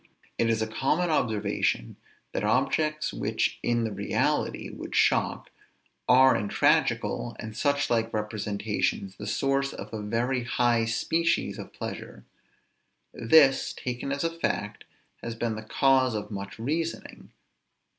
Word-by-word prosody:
It 115 Hz, -, +2 dB
is 110 Hz, -1 st, +1 dB
a -, -, -2 dB
common 150 Hz, +10 st, 0 dB
observation, 110 Hz, -, 0 dB, 0.4 s
that -, -, -2 dB
objects 155 Hz, -1 st, +1 dB
which 110 Hz, +1 st, -1 dB
in 120 Hz, -1 st, +1 dB
the 110 Hz, -, -2 dB
reality 100 Hz, 0 st, -1 dB
would -, -, -7 dB
shock, -, -, +2 dB, 0.6 s
are 130 Hz, +1 st, +7 dB
in 105 Hz, -, -1 dB
tragical, 120 Hz, +3 st, +1 dB
and 110 Hz, -1 st, -7 dB
such 145 Hz, +2 st, +1 dB
like 115 Hz, -1 st, 0 dB
representations, 105 Hz, -2 st, -2 dB
the 105 Hz, -, -7 dB
source 135 Hz, +4 st, 0 dB
of -, -, -9 dB
a 110 Hz, -, -4 dB
very 120 Hz, +4 st, -1 dB
high 120 Hz, -1 st, +2 dB
species 165 Hz, +9 st, 0 dB
of -, -, -8 dB
pleasure. -, -, -7 dB, 0.9 s
This, 135 Hz, +2 st, +4 dB
taken 125 Hz, +2 st, -4 dB
as 140 Hz, +2 st, -1 dB
a 165 Hz, -, 0 dB
fact, 105 Hz, -10 st, -3 dB, 0.4 s
has 115 Hz, -1 st, -5 dB
been 115 Hz, -1 st, -2 dB
the 110 Hz, -, -6 dB
cause 130 Hz, +1 st, +2 dB
of 105 Hz, 0 st, -5 dB
much 100 Hz, -1 st, -6 dB
reasoning. 160 Hz, +8 st, -4 dB
115 Hz, 135 wpm, -27 LUFS, 110-135 Hz, 0.9 s, are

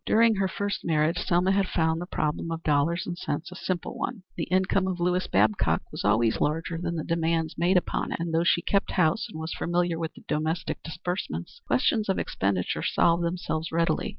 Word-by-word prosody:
During 225 Hz, -1 st, +4 dB
her 195 Hz, 0 st, +2 dB
first 205 Hz, +2 st, -3 dB
marriage 160 Hz, +2 st, +1 dB
Selma 180 Hz, +2 st, +2 dB
had 195 Hz, -1 st, +2 dB
found 160 Hz, -1 st, +1 dB
the 175 Hz, -, -5 dB
problem 150 Hz, -1 st, -2 dB
of 165 Hz, 0 st, -4 dB
dollars 155 Hz, +4 st, +1 dB
and 175 Hz, -, -4 dB
cents 170 Hz, 0 st, -4 dB
a -, -, -9 dB
simple 185 Hz, -1 st, -3 dB
one. 215 Hz, -7 st, -4 dB
The -, -, -2 dB
income 190 Hz, +1 st, +2 dB
of 185 Hz, -2 st, -2 dB
Lewis 180 Hz, +1 st, +1 dB
Babcock 105 Hz, +2 st, +2 dB
was -, -, -5 dB
always 110 Hz, +2 st, +2 dB
larger 165 Hz, +2 st, 0 dB
than 170 Hz, 0 st, -2 dB
the 160 Hz, -, -2 dB
demands 165 Hz, -1 st, 0 dB
made 180 Hz, +2 st, +3 dB
upon 180 Hz, -, -1 dB
it, -, -, -2 dB
and 165 Hz, 0 st, -3 dB
though 165 Hz, +1 st, +3 dB
she 170 Hz, 0 st, +3 dB
kept 200 Hz, 0 st, +1 dB
house 160 Hz, -4 st, +2 dB
and 160 Hz, -, -8 dB
was 160 Hz, +1 st, -4 dB
familiar 175 Hz, -1 st, 0 dB
with 160 Hz, -1 st, -4 dB
the -, -, -14 dB
domestic 160 Hz, +3 st, -1 dB
disbursements, 180 Hz, -, -5 dB
questions 220 Hz, -8 st, +2 dB
of 190 Hz, -, +2 dB
expenditure 95 Hz, -2 st, -1 dB
solved 170 Hz, 0 st, +2 dB
themselves 170 Hz, -2 st, -2 dB
readily. 165 Hz, +1 st, +1 dB
170 Hz, 205 wpm, -27 LUFS, 160-180 Hz, -, During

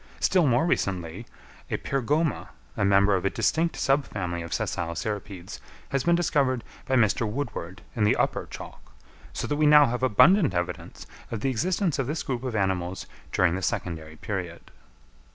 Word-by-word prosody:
Still 180 Hz, -5 st, +3 dB
more 130 Hz, +6 st, +3 dB
recently, 95 Hz, -, -2 dB, 0.4 s
a -, -, -1 dB
Pyrgoma, 145 Hz, +4 st, 0 dB, 0.3 s
a -, -, 0 dB
member 100 Hz, +1 st, +4 dB
of 95 Hz, -, -1 dB
a 100 Hz, -, +2 dB
distinct 160 Hz, +11 st, 0 dB
subfamily 100 Hz, -, -1 dB
of 85 Hz, -, -9 dB
sessile 85 Hz, -1 st, -2 dB
cirripedes, 100 Hz, -3 st, -5 dB, 0.3 s
has 135 Hz, -2 st, -1 dB
been 170 Hz, 0 st, +4 dB
discovered 140 Hz, -7 st, +1 dB, 0.2 s
by 130 Hz, -, +2 dB
Mr. 110 Hz, -1 st, +2 dB
Woodward 105 Hz, -6 st, -5 dB
in 110 Hz, -, +1 dB
the 105 Hz, -, +4 dB
upper -, -, 0 dB
chalk; -, -, -11 dB, 0.4 s
so -, -, -4 dB
that 145 Hz, -, -1 dB
we 155 Hz, 0 st, +4 dB
now 150 Hz, 0 st, +8 dB
have 125 Hz, -1 st, -2 dB
abundant 145 Hz, -, +5 dB
evidence 90 Hz, 0 st, -4 dB, 0.2 s
of 115 Hz, -3 st, -4 dB
the 135 Hz, -, +1 dB
existence 170 Hz, -, 0 dB
of 130 Hz, -, 0 dB
this 155 Hz, +3 st, -2 dB
group 130 Hz, -2 st, -3 dB
of 125 Hz, -3 st, -3 dB
animals 95 Hz, -2 st, -1 dB, 0.3 s
during 90 Hz, -2 st, +3 dB
the 95 Hz, -, -2 dB
secondary 80 Hz, -4 st, -3 dB
period. 90 Hz, -2 st, -6 dB
115 Hz, 170 wpm, -26 LUFS, 95-145 Hz, 0.4 s, now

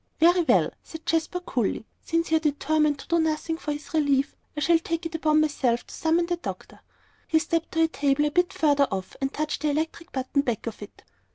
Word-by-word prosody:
"Very 350 Hz, +2 st, +5 dB
well," 335 Hz, -, +3 dB
said 320 Hz, 0 st, -11 dB
Jasper, 330 Hz, +2 st, 0 dB
coolly, 240 Hz, -, -1 dB, 0.2 s
"since 330 Hz, 0 st, -1 dB
you 320 Hz, -, +5 dB
are -, -, +1 dB
determined 300 Hz, 0 st, +1 dB
to -, -, -12 dB
do 340 Hz, -1 st, +2 dB
nothing 320 Hz, 0 st, 0 dB
for 300 Hz, -, -3 dB
his 295 Hz, +2 st, -7 dB
relief, 285 Hz, -3 st, +2 dB, 0.2 s
I -, -, 0 dB
shall 335 Hz, +1 st, +4 dB
take 330 Hz, +1 st, -3 dB
it 330 Hz, -, -4 dB
upon 310 Hz, -1 st, +3 dB
myself 260 Hz, -6 st, 0 dB
to -, -, -13 dB
summon 330 Hz, +2 st, +1 dB
the 350 Hz, 0 st, -1 dB
doctor." -, -, -7 dB, 0.5 s
He 320 Hz, -, +3 dB
stepped 330 Hz, +1 st, -1 dB
to 325 Hz, -1 st, +3 dB
a -, -, +4 dB
table 290 Hz, -2 st, +1 dB
a 295 Hz, -, 0 dB
bit 355 Hz, +3 st, +2 dB
further 290 Hz, -6 st, +3 dB
off, 190 Hz, -2 st, -5 dB
and 270 Hz, 0 st, 0 dB
touched 305 Hz, -1 st, -3 dB
the 305 Hz, -, +1 dB
electric 320 Hz, +4 st, -3 dB
button 265 Hz, +1 st, 0 dB
back 240 Hz, -6 st, -2 dB
of 230 Hz, -2 st, -6 dB
it. 205 Hz, -, -11 dB
310 Hz, 220 wpm, -26 LUFS, 285-330 Hz, 0.5 s, Very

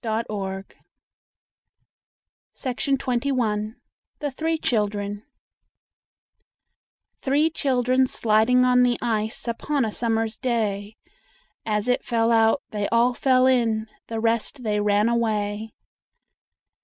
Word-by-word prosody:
CHILDREN'S 205 Hz, -4 st, -3 dB, 1.9 s
FAVORITE 265 Hz, +1 st, -1 dB
POEMS 240 Hz, -5 st, -1 dB, 0.4 s
THE 290 Hz, -2 st, -3 dB
THREE 320 Hz, +4 st, -1 dB
CHILDREN 205 Hz, -5 st, -1 dB, 2.0 s
Three 295 Hz, +4 st, +2 dB
children 260 Hz, -3 st, +1 dB
sliding 230 Hz, +3 st, +3 dB
on 250 Hz, 0 st, +4 dB
the 245 Hz, -1 st, +3 dB
ice 220 Hz, -1 st, -1 dB
Upon 265 Hz, +3 st, -1 dB
a 220 Hz, -, -3 dB
summer's 225 Hz, -1 st, -1 dB
day, 215 Hz, -4 st, -2 dB, 0.7 s
As 210 Hz, +1 st, 0 dB
it 250 Hz, -, +1 dB
fell 230 Hz, -1 st, +1 dB
out 225 Hz, +3 st, +3 dB
they 205 Hz, -1 st, -2 dB
all 235 Hz, +2 st, +3 dB
fell 255 Hz, 0 st, +3 dB
in, 230 Hz, -4 st, +2 dB, 0.2 s
The 225 Hz, -1 st, -4 dB
rest 230 Hz, +4 st, -1 dB
they 210 Hz, -2 st, 0 dB
ran 205 Hz, +1 st, +2 dB
away. 220 Hz, -2 st, -1 dB
230 Hz, 105 wpm, -24 LUFS, 215-250 Hz, 2.0 s, on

